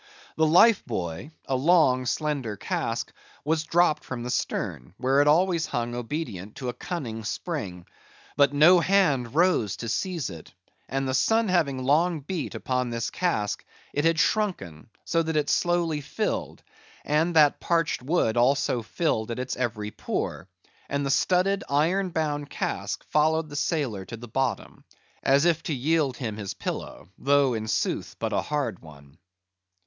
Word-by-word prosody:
The 160 0 +3
life 190 +7 +6
buoy—a 110 - -4
long 130 -3 +3
slender 140 -8 -2
cask—was 160 +9 -3
dropped 175 -1 +2
from 125 -2 -5
the 125 - -3
stern, 65 - -3
where 135 +2 +3
it 145 - +2
always 170 +2 +3
hung 120 0 -2
obedient 120 - -5
to 130 -2 -4
a - - -3
cunning 120 -12 -5
spring; 100 - -4 0.5
but 140 -1 +4
no 160 +5 +6
hand 150 -10 +2
rose 165 - +3
to 115 - -5
seize 145 - -2
it, 80 -2 -12 0.3
and 135 +1 -1
the 130 - -1
sun 225 +8 +2
having 140 -8 +1
long 155 +4 +2
beat 160 +2 -4
upon 125 -1 -1
this 115 -1 -3
cask 110 - -1 0.3
it 145 - 0
had 165 0 +3
shrunken, 175 - -1 0.2
so 165 - +1
that 160 -1 -2
it 150 -1 +1
slowly 170 -3 +1
filled, 210 +9 -3 0.4
and 160 +3 +1
that 150 -2 +5
parched 165 -5 0
wood 125 -5 +1
also 130 0 +2
filled 110 -2 -1
at 115 - -3
its 125 0 -3
every 110 -4 -3
pore; 95 - -4 0.4
and 140 0 -1
the 135 - 0
studded 190 +6 +2
iron 175 +7 +2
bound 150 -3 -2
cask 100 +1 -3
followed 155 +1 +2
the 145 - -8
sailor 140 - -1
to 115 - -8
the 120 +2 -10
bottom, 130 +2 -2 0.4
as 140 +3 +3
if 170 -2 +3
to 155 - -2
yield 140 -1 +1
him 110 -4 -4
his 100 -3 -5
pillow, - - -6
though 140 -2 +3
in 110 -1 -3
sooth - - -1
but - - -2
a - - +1
hard 145 -10 -2
one. 70 0 -16
140 Hz, 160 wpm, -26 LUFS, 120-165 Hz, 0.5 s, life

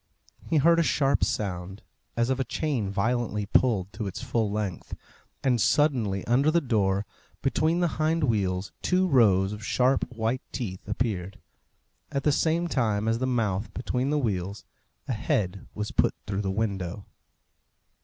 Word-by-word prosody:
He 160 - +3
heard 165 +3 +5
a - - +5
sharp 140 -3 +2
sound, 95 -1 -3 0.3
as 120 +2 +2
of 130 - 0
a - - +2
chain 130 -9 -2
violently 105 +1 0
pulled 100 -4 +2
to 105 +1 -4
its 95 - -5
full 115 -4 0
length, 100 -3 -4 0.5
and 125 -4 +2
suddenly, 120 -9 +2
under 135 +5 +3
the 170 +2 +4
door, 105 -8 +1 0.4
between 160 +5 +2
the 175 - +3
hind 160 +1 +2
wheels, 100 -6 0
two 185 +1 +2
rows 105 - +4
of 105 0 -8
sharp 125 +5 +2
white 115 +2 -1
teeth 95 -8 -5
appeared. 100 -4 -2 0.7
At 140 -2 -1
the 150 - +4
same 165 +4 +1
time 110 -8 0
as 115 +1 +1
the 130 - 0
mouth 110 -5 0
between 125 +2 -1
the 150 - +1
wheels 100 -6 -2 0.4
a 130 - -1
head 100 -3 -1
was 105 0 -3
put - - +2
through 100 0 -2
the 95 - -2
window. 100 -2 -2
115 Hz, 160 wpm, -27 LUFS, 100-135 Hz, 0.7 s, heard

